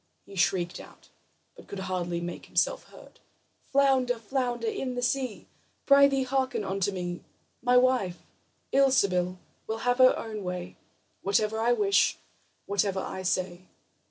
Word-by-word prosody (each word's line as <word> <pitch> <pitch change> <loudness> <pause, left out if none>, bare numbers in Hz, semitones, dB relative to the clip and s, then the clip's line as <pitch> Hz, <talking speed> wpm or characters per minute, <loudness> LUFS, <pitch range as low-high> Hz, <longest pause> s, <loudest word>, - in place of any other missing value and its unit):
He 200 - -14
shrieked 175 -1 0
out, - - -15 0.5
but - - -15
could 200 - -7
hardly 175 -2 -2
make 175 0 -6
himself - - 0
heard: - - -16 0.5
"Flounder, 265 -3 +3
flounder 245 - -2
in 270 - -3
the 245 - -2
sea, 250 -2 -1 0.4
Prythee, 280 -1 +5
hearken 260 -3 -1
unto 195 0 -1
me: 175 -2 -4 0.4
My 250 0 +4
wife, 250 -8 +2 0.6
Ilsebil, 195 -10 +3 0.3
will 220 - -2
have 245 +1 +2
her 255 0 +6
own 215 -2 -6
way 180 -1 -5 0.5
Whatever 215 +2 +1
I 235 +2 +3
wish, 400 +8 +3 0.5
whatever 200 -1 0
I 190 0 -5
say." 185 0 -2
220 Hz, 135 wpm, -28 LUFS, 185-260 Hz, 0.6 s, her